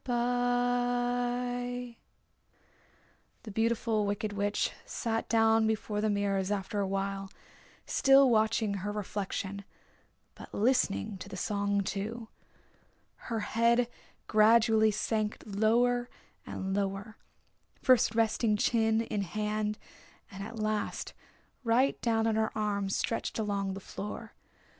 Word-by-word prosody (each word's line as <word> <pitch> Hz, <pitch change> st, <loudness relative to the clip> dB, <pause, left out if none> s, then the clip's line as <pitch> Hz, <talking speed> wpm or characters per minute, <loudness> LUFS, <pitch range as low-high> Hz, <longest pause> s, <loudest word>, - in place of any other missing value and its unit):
The 245 Hz, 0 st, 0 dB, 1.6 s
Beautiful 225 Hz, -1 st, +1 dB
Wicked 205 Hz, +1 st, -2 dB
Witch 205 Hz, 0 st, 0 dB
sat 225 Hz, -2 st, -3 dB
down 225 Hz, -1 st, +4 dB
before 215 Hz, -1 st, -1 dB
the 215 Hz, -, +1 dB
mirrors 200 Hz, -2 st, 0 dB
after 205 Hz, +1 st, -2 dB
a 200 Hz, -, 0 dB
while, 195 Hz, 0 st, -2 dB, 0.6 s
still 270 Hz, 0 st, +5 dB
watching 220 Hz, -1 st, +2 dB
her 205 Hz, +2 st, -2 dB
reflection, 200 Hz, -1 st, -4 dB, 0.7 s
but -, -, -11 dB
listening 200 Hz, -, +1 dB
to -, -, -8 dB
the 190 Hz, -, -7 dB
song, 200 Hz, +1 st, 0 dB
too. 220 Hz, +4 st, -4 dB, 1.0 s
Her 225 Hz, -2 st, -1 dB
head 235 Hz, +3 st, +2 dB, 0.4 s
gradually 220 Hz, 0 st, +5 dB
sank 215 Hz, 0 st, -1 dB
lower 240 Hz, +4 st, +2 dB, 0.4 s
and 190 Hz, 0 st, -3 dB
lower, 200 Hz, +2 st, -3 dB, 0.6 s
first 245 Hz, -4 st, +4 dB
resting 225 Hz, -1 st, +2 dB
chin 225 Hz, 0 st, +2 dB
in 215 Hz, -2 st, -2 dB
hand 210 Hz, +3 st, -2 dB, 0.5 s
and 195 Hz, 0 st, -7 dB
at 225 Hz, +3 st, -8 dB
last 215 Hz, -1 st, -2 dB, 0.5 s
right 245 Hz, +3 st, +2 dB
down 225 Hz, -1 st, +1 dB
on 225 Hz, -1 st, +2 dB
her 220 Hz, 0 st, +2 dB
arm 200 Hz, -2 st, -1 dB
stretched 230 Hz, +3 st, -2 dB
along 200 Hz, -3 st, -1 dB
the -, -, -6 dB
floor. 200 Hz, +1 st, -7 dB
220 Hz, 110 wpm, -30 LUFS, 205-235 Hz, 1.6 s, still